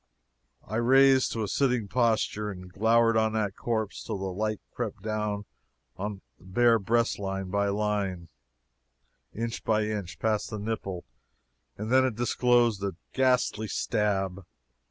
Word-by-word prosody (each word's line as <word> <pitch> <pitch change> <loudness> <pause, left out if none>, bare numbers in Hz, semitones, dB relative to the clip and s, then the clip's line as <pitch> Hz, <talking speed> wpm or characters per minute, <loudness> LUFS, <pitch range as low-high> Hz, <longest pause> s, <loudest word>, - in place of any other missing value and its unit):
I 110 - -2
raised 130 +2 +5
to 115 - -2
a - - -2
sitting 125 -2 +1
posture 110 -2 +1
and 90 -2 -9
glowered 115 +2 +3
on 110 0 +2
that 105 -3 -1
corpse 110 -3 -2
till - - -4
the 95 -1 -4
light 110 +2 -1
crept 110 -4 -4
down 105 -1 -2 0.5
the 100 0 -4 0.2
bare 115 +5 +3
breastline 95 -3 -1
by 100 0 +1
line 100 -4 -1 1.0
inch 115 +1 -4
by 110 -1 +2
inch 105 -4 -4
past 110 -2 0
the 110 - -4
nipple 100 -4 -4 0.7
and 110 +3 -4
then 130 0 +6
it 130 -4 0
disclosed 120 -2 +2
a 100 -3 -2 0.2
ghastly 125 -4 +2
stab! 100 -3 -1
110 Hz, 135 wpm, -28 LUFS, 100-115 Hz, 1.0 s, then